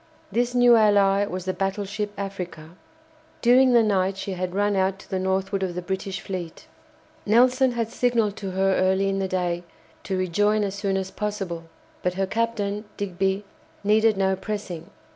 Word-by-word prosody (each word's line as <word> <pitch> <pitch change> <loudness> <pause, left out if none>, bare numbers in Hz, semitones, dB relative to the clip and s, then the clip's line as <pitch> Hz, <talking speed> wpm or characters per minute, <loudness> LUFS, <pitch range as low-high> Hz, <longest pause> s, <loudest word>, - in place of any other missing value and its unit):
This 245 +1 0
new 245 -1 +7
ally 205 -2 +4
was 185 -1 -5
the 185 - -1
battleship 200 +2 -2
"Africa." 180 -5 -6 0.7
During 250 +1 +6
the 235 -1 +6
night 195 -2 +1
she 195 - -4
had 185 0 -3
run 205 0 +2
out 190 0 +1
to - - -16
the 190 - 0
northward 190 +1 -1
of 185 -2 -2
the 180 - -3
British 190 0 -4
fleet. 180 -4 -6 0.6
Nelson 250 +4 +4
had 230 -2 -1
signalled 230 -4 +1
to 195 - -4
her 190 +1 +1
early 190 +1 +2
in 195 0 -1
the 190 - 0
day 180 -2 -1 0.4
to 190 - -1
rejoin 205 +4 +2
as 195 -1 -2
soon 200 -1 -1
as 190 0 -3
possible, 195 -6 -4 0.4
but 180 0 -1
her 195 +1 0
captain, 210 -1 -2
Digby, 195 +1 -1 0.4
needed 215 +1 +3
no 190 0 +2
pressing. 190 -4 -5
195 Hz, 170 wpm, -24 LUFS, 190-210 Hz, 0.7 s, new